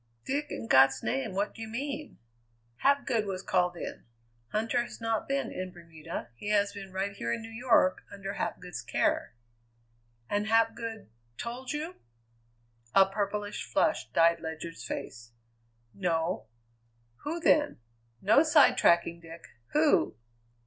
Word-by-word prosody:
"Dick, 285 Hz, +2 st, -1 dB
in -, -, -5 dB
God's 135 Hz, -4 st, +5 dB
name, 135 Hz, +9 st, -1 dB
what 200 Hz, +2 st, 0 dB
do 225 Hz, -, -11 dB
you 225 Hz, -, -4 dB
mean?" 280 Hz, +6 st, -5 dB, 0.6 s
"Hapgood 260 Hz, -6 st, +2 dB
was 190 Hz, -1 st, -4 dB
called 180 Hz, -1 st, +1 dB
in. -, -, -6 dB, 0.5 s
Huntter 225 Hz, +2 st, +1 dB
has 240 Hz, -, -7 dB
not 225 Hz, -1 st, -1 dB
been 275 Hz, 0 st, -1 dB
in 185 Hz, 0 st, -5 dB
Bermuda; 165 Hz, -6 st, -8 dB
he 205 Hz, -, -5 dB
has 205 Hz, -1 st, +2 dB
been 195 Hz, -1 st, -8 dB
right 190 Hz, +2 st, -2 dB
here 115 Hz, -12 st, -3 dB
in 115 Hz, -, -2 dB
New 225 Hz, -, -9 dB
York, 225 Hz, -5 st, +3 dB
under 200 Hz, 0 st, -5 dB
Hapgood's 180 Hz, -, -4 dB
care." 115 Hz, 0 st, 0 dB, 0.9 s
"And 205 Hz, +1 st, 0 dB
Hapgood 225 Hz, -, 0 dB, 0.3 s
told 245 Hz, +2 st, -5 dB
you?" 310 Hz, +4 st, -4 dB, 1.0 s
A 195 Hz, -, +8 dB
purplish 205 Hz, +1 st, -3 dB
flush -, -, +1 dB
dyed 170 Hz, 0 st, +4 dB
Ledyard's 160 Hz, -5 st, -6 dB
face. 115 Hz, -1 st, -6 dB, 0.6 s
"No." 165 Hz, -, -1 dB, 0.7 s
"Who, 325 Hz, +4 st, -4 dB
then? 300 Hz, -3 st, +3 dB, 0.5 s
No 215 Hz, +7 st, +6 dB
sidetracking, 170 Hz, -, +4 dB
Dick. 165 Hz, 0 st, -11 dB, 0.3 s
Who?" -, -, +3 dB
200 Hz, 135 wpm, -30 LUFS, 170-230 Hz, 1.0 s, A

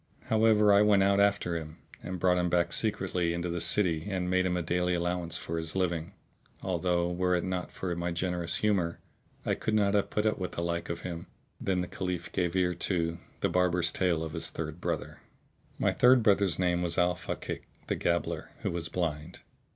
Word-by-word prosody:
However 110 Hz, -2 st, +5 dB
I 100 Hz, -, +6 dB
went 105 Hz, -2 st, +5 dB
out 100 Hz, 0 st, +3 dB
after 100 Hz, -4 st, +2 dB
him 80 Hz, -1 st, -6 dB, 0.2 s
and 90 Hz, 0 st, -5 dB
brought 90 Hz, 0 st, +3 dB
him 90 Hz, 0 st, +1 dB
back 85 Hz, -1 st, +1 dB
secretly 90 Hz, -5 st, 0 dB
into 85 Hz, +1 st, -2 dB
the 85 Hz, 0 st, -2 dB
city 85 Hz, -1 st, +2 dB
and 90 Hz, -2 st, -1 dB
made 95 Hz, 0 st, +3 dB
him 90 Hz, -1 st, 0 dB
a 85 Hz, -, -1 dB
daily 90 Hz, +2 st, +1 dB
allowance 85 Hz, -1 st, -1 dB
for 80 Hz, +1 st, -3 dB
his 80 Hz, +1 st, -4 dB
living: 85 Hz, -3 st, -1 dB, 0.5 s
although, 90 Hz, -1 st, 0 dB
were 90 Hz, +1 st, +1 dB
it 85 Hz, -, 0 dB
not 95 Hz, -1 st, -3 dB
for 90 Hz, -2 st, -3 dB
my 85 Hz, +1 st, -2 dB
generous 85 Hz, -1 st, -1 dB
humour, 90 Hz, -4 st, +1 dB, 0.5 s
I -, -, +1 dB
could 110 Hz, -, -1 dB
not 100 Hz, -2 st, +3 dB
have 100 Hz, -1 st, +2 dB
put 105 Hz, -, -1 dB
up 110 Hz, -, +1 dB
with 90 Hz, -, -4 dB
the 85 Hz, -, -3 dB
like 85 Hz, 0 st, -2 dB
of 85 Hz, 0 st, -4 dB
him. 85 Hz, -2 st, -6 dB, 0.3 s
Then 95 Hz, -2 st, 0 dB
the 90 Hz, -, -3 dB
Caliph 90 Hz, -2 st, -4 dB
gave 90 Hz, -1 st, -1 dB
ear 90 Hz, -1 st, +2 dB
to 85 Hz, -1 st, -1 dB, 0.2 s
The -, -, +2 dB
Barber's 90 Hz, -1 st, +2 dB
Tale 85 Hz, -4 st, +1 dB
of 80 Hz, -1 st, -5 dB
his -, -, -2 dB
Third 80 Hz, +1 st, -6 dB
Brother. -, -, -3 dB, 0.6 s
My -, -, +2 dB
third 125 Hz, -1 st, +5 dB
brother's 100 Hz, -5 st, +3 dB
name 90 Hz, -1 st, +1 dB
was 85 Hz, -1 st, -1 dB
Al 90 Hz, 0 st, +3 dB
Fakík, -, -, -5 dB, 0.2 s
the -, -, -1 dB
Gabbler, -, -, -1 dB
who -, -, -1 dB
was 85 Hz, -1 st, -3 dB
blind. 80 Hz, -1 st, -3 dB
90 Hz, 205 wpm, -29 LUFS, 85-95 Hz, 0.6 s, I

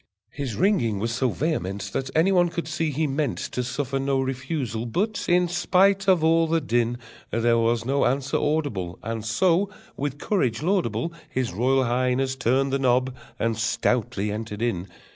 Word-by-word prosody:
His 135 Hz, -7 st, -4 dB
ringing 120 Hz, -, +2 dB
was 115 Hz, +4 st, -2 dB
so 125 Hz, +2 st, +1 dB
vehement 100 Hz, -, -2 dB
That 135 Hz, 0 st, -2 dB
any 165 Hz, +5 st, +4 dB
one 175 Hz, -2 st, +4 dB
could 170 Hz, -2 st, -4 dB
see 160 Hz, 0 st, -1 dB
he 155 Hz, +2 st, 0 dB
meant 140 Hz, -2 st, -1 dB
To 125 Hz, -, -3 dB
suffer 135 Hz, +2 st, -2 dB
no 135 Hz, 0 st, 0 dB
refusal, 130 Hz, -3 st, -3 dB
but, 205 Hz, -, -1 dB
in 180 Hz, 0 st, +4 dB
spite 190 Hz, +3 st, +2 dB
of 185 Hz, -4 st, +4 dB
all 165 Hz, 0 st, +4 dB
the 165 Hz, +1 st, +2 dB
din, 120 Hz, -4 st, 0 dB, 0.3 s
There 115 Hz, 0 st, +2 dB
was 115 Hz, 0 st, +1 dB
no 140 Hz, +2 st, +2 dB
answer 135 Hz, +2 st, 0 dB
audible, 140 Hz, -, -1 dB
And 115 Hz, 0 st, -4 dB
so, 175 Hz, -, +2 dB, 0.3 s
with 140 Hz, 0 st, -3 dB
courage 140 Hz, -, 0 dB
laudable, 170 Hz, -, 0 dB, 0.2 s
His 130 Hz, -, -2 dB
Royal 130 Hz, +6 st, +2 dB
Highness 130 Hz, +2 st, 0 dB
turned 135 Hz, +2 st, +1 dB
the 135 Hz, -, +1 dB
knob, 130 Hz, 0 st, +2 dB, 0.2 s
and 115 Hz, -1 st, 0 dB
stoutly 110 Hz, -2 st, 0 dB
entered 110 Hz, 0 st, -4 dB
in. 95 Hz, -6 st, -1 dB
130 Hz, 170 wpm, -25 LUFS, 115-160 Hz, 0.3 s, any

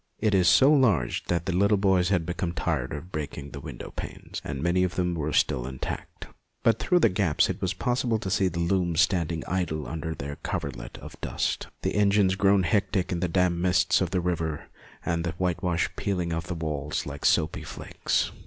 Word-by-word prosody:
It 110 Hz, -1 st, +1 dB
was 90 Hz, -2 st, +4 dB
so 135 Hz, -, +7 dB
large 100 Hz, -, +2 dB
that 85 Hz, -1 st, -1 dB
the 95 Hz, -, -1 dB
little 100 Hz, +2 st, +4 dB
boys 95 Hz, -2 st, +3 dB
had 90 Hz, -5 st, +1 dB
become 85 Hz, 0 st, -2 dB
tired 75 Hz, -7 st, -1 dB
of 80 Hz, +5 st, -7 dB
breaking 70 Hz, -2 st, -5 dB
the 70 Hz, -, -7 dB
window 70 Hz, -4 st, -8 dB
panes, -, -, -6 dB
and 70 Hz, -2 st, -4 dB
many 85 Hz, +4 st, +2 dB
of 90 Hz, -1 st, -1 dB
them 90 Hz, -1 st, 0 dB
were 75 Hz, -2 st, -2 dB
still 65 Hz, -3 st, +1 dB
intact; 65 Hz, -1 st, -6 dB, 0.4 s
but 115 Hz, -1 st, +3 dB
through 180 Hz, -, +2 dB
the -, -, +6 dB
gaps 90 Hz, -5 st, +2 dB
it -, -, -8 dB
was 95 Hz, 0 st, -1 dB
possible 120 Hz, +2 st, 0 dB
to 95 Hz, -3 st, -4 dB
see 95 Hz, 0 st, +3 dB
the 85 Hz, -1 st, -4 dB
looms 85 Hz, -1 st, +2 dB
standing 85 Hz, -2 st, +1 dB
idle 85 Hz, -5 st, -2 dB
under 80 Hz, 0 st, -4 dB
their 70 Hz, +1 st, -6 dB
246 -, -, -36 dB, 0.5 s
MONOLOGUES -, -, -14 dB
coverlet -, -, -8 dB
of -, -, -11 dB
dust, -, -, -2 dB, 0.2 s
the -, -, 0 dB
engines 100 Hz, -2 st, +3 dB
grown 100 Hz, 0 st, +3 dB
hectic 100 Hz, 0 st, +1 dB
in 90 Hz, -, -1 dB
the 90 Hz, -, 0 dB
damp 90 Hz, 0 st, +2 dB
mists 90 Hz, 0 st, +3 dB
of -, -, +1 dB
the 90 Hz, -, 0 dB
river, 85 Hz, -3 st, -2 dB, 0.4 s
and 85 Hz, -1 st, 0 dB
the 85 Hz, -1 st, -2 dB
whitewash 90 Hz, 0 st, 0 dB
peeling 90 Hz, -4 st, -1 dB
from 80 Hz, 0 st, -1 dB
the 90 Hz, -, -3 dB
walls 75 Hz, -3 st, -2 dB
in 70 Hz, 0 st, -6 dB
soapy 80 Hz, 0 st, +2 dB
flakes. -, -, -2 dB
90 Hz, 210 wpm, -27 LUFS, 80-95 Hz, 0.5 s, so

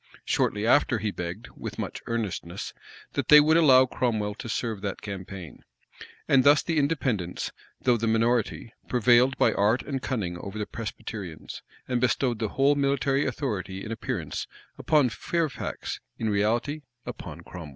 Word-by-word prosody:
Shortly 105 Hz, +1 st, +1 dB
after, 120 Hz, 0 st, +4 dB
he 105 Hz, 0 st, -2 dB
begged, 90 Hz, +5 st, -6 dB
with -, -, -7 dB
much -, -, -4 dB
earnestness, 105 Hz, -5 st, -3 dB, 0.4 s
that -, -, -1 dB
they 150 Hz, -, +10 dB
would 155 Hz, +2 st, +4 dB
allow 135 Hz, -6 st, +7 dB
Cromwell 110 Hz, -5 st, -1 dB
to 115 Hz, -, -8 dB
serve 110 Hz, -2 st, -2 dB
that 100 Hz, -1 st, -3 dB
campaign.[] 95 Hz, -, -7 dB, 0.6 s
And 135 Hz, -1 st, +5 dB
thus 145 Hz, +2 st, +6 dB
the 165 Hz, -2 st, +1 dB
Independents, 130 Hz, -, -1 dB, 0.3 s
though 125 Hz, -2 st, +3 dB
the 115 Hz, +1 st, -1 dB
minority, 115 Hz, +1 st, +1 dB, 0.2 s
prevailed 125 Hz, +2 st, +4 dB
by -, -, +4 dB
art 105 Hz, +5 st, +2 dB
and 135 Hz, -2 st, -3 dB
cunning 95 Hz, -11 st, -2 dB
over 100 Hz, +3 st, -7 dB
the 105 Hz, -, -2 dB
Presbyterians, 105 Hz, -, -7 dB, 0.3 s
and 125 Hz, -2 st, 0 dB
bestowed 125 Hz, -2 st, +1 dB
the 110 Hz, -, -1 dB
whole 135 Hz, +4 st, +3 dB
military 140 Hz, 0 st, +1 dB
authority 100 Hz, -8 st, -3 dB
in 110 Hz, -, -6 dB
appearance, 115 Hz, -, -3 dB, 0.3 s
upon 150 Hz, -5 st, +3 dB
Fairfax; 160 Hz, +5 st, -3 dB, 0.2 s
in 110 Hz, -1 st, -1 dB
reality, 115 Hz, +9 st, 0 dB, 0.2 s
upon -, -, -7 dB
Cromwell. 85 Hz, -4 st, -9 dB
115 Hz, 150 wpm, -27 LUFS, 105-135 Hz, 0.6 s, they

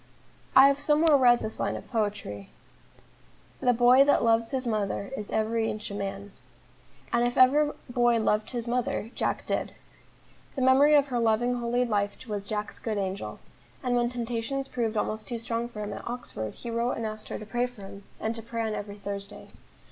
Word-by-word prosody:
I 265 Hz, +1 st, +10 dB
have 280 Hz, 0 st, +2 dB
somewhere 300 Hz, +1 st, +4 dB
read 245 Hz, -3 st, +5 dB
this 220 Hz, -, -5 dB
line -, -, -1 dB
of -, -, -8 dB
poetry: 205 Hz, -, -3 dB, 1.1 s
"The 250 Hz, -, +3 dB
boy 245 Hz, +3 st, +6 dB
that 285 Hz, -, +3 dB
loves 230 Hz, 0 st, +3 dB
his 265 Hz, -2 st, -2 dB
mother 210 Hz, -1 st, -2 dB
Is 210 Hz, -5 st, -6 dB
every 220 Hz, +1 st, 0 dB
inch 210 Hz, -1 st, -5 dB
a -, -, -5 dB
man," 200 Hz, 0 st, -5 dB, 0.8 s
and 235 Hz, 0 st, +3 dB
if 245 Hz, 0 st, 0 dB
ever 290 Hz, +4 st, +5 dB
boy 240 Hz, -1 st, +2 dB
loved 215 Hz, -1 st, +1 dB
his 240 Hz, -2 st, -4 dB
mother, 240 Hz, -2 st, -1 dB
Jack -, -, -2 dB
did. -, -, -2 dB, 0.8 s
The 265 Hz, -, -1 dB
memory 275 Hz, +4 st, +6 dB
of 285 Hz, -1 st, +4 dB
her 245 Hz, -2 st, 0 dB
loving, 230 Hz, +2 st, +2 dB
holy 240 Hz, +1 st, +1 dB
life 205 Hz, -3 st, 0 dB
was 205 Hz, -2 st, -4 dB
Jack's 210 Hz, 0 st, -4 dB
good 220 Hz, -2 st, -3 dB
angel; 195 Hz, 0 st, -4 dB, 0.4 s
and 250 Hz, -1 st, +1 dB
when 240 Hz, 0 st, +2 dB
temptations 245 Hz, +3 st, -3 dB
proved 230 Hz, -4 st, -2 dB
almost 215 Hz, +1 st, -2 dB
too 240 Hz, -, -3 dB
strong 230 Hz, +1 st, -3 dB
for 215 Hz, -3 st, -7 dB
him 205 Hz, 0 st, -4 dB
at -, -, -8 dB
Oxford, 235 Hz, -, -5 dB
he 235 Hz, -, -6 dB
wrote 235 Hz, +2 st, 0 dB
and 230 Hz, -, -4 dB
asked 215 Hz, 0 st, -6 dB
her -, -, -4 dB
to 215 Hz, -, -8 dB
pray 240 Hz, +3 st, 0 dB
for 245 Hz, -5 st, -13 dB
him, 195 Hz, +1 st, -10 dB, 0.2 s
and 220 Hz, -, -1 dB
to 230 Hz, -, -5 dB
pray 230 Hz, +1 st, -4 dB
on 220 Hz, -1 st, -2 dB
every 205 Hz, -1 st, -6 dB
Thursday. 200 Hz, 0 st, -7 dB
230 Hz, 195 wpm, -27 LUFS, 210-245 Hz, 1.1 s, I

